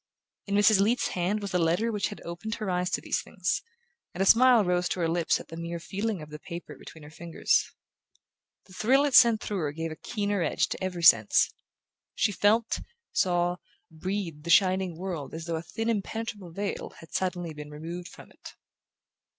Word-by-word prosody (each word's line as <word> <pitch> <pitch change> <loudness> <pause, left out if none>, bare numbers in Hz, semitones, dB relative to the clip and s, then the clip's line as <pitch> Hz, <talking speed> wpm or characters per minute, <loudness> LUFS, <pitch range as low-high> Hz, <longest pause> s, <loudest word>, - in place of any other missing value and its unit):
In 200 - -1
Mrs. 205 0 +5
Leath's 225 +5 +2
hand 190 +4 -1
was 200 - -4
the 180 - +1
letter 175 +8 +1
which 210 -3 -1
had 205 - -9
opened 175 +6 -5
her 215 -4 -3
eyes 180 0 0
to - - -1
these - - -1
things, - - -2 0.5
and 190 - +1
a - - 0
smile 235 0 +6
rose 180 0 +1
to - - -2
her 165 - +2
lips 165 0 +1
at - - -12
the 165 - -8
mere 170 0 -4
feeling 200 +1 -3
of 150 - -12
the 150 - -8
paper 170 +2 -8
between 160 - -13
her 150 - -12
fingers. 165 +1 0 1.0
The 185 - -17
thrill 265 +9 +3
it 285 - -1
sent 230 -3 +7
through 205 -2 -3
her 150 -4 -1
gave 165 +2 -4
a - - -6
keener 205 +1 -2
edge 155 -1 +1
to - - -5
every 180 -2 -3
sense. 110 -9 +5 0.6
She 205 - +2
felt, 215 +3 +2 0.3
saw, 175 -1 +1 0.3
breathed 165 -2 -4
the 170 - -7
shining 185 -1 +3
world 170 -6 -5
as 160 0 -6
though 170 -1 -2
a - - -4
thin 225 +6 -5
impenetrable 215 -3 -3
veil 200 +3 -4
had 165 - -15
suddenly 175 -3 -2
been 150 0 -9
removed 165 +4 -7
from 180 - -14
it. - - -13
180 Hz, 200 wpm, -28 LUFS, 165-205 Hz, 1.0 s, sent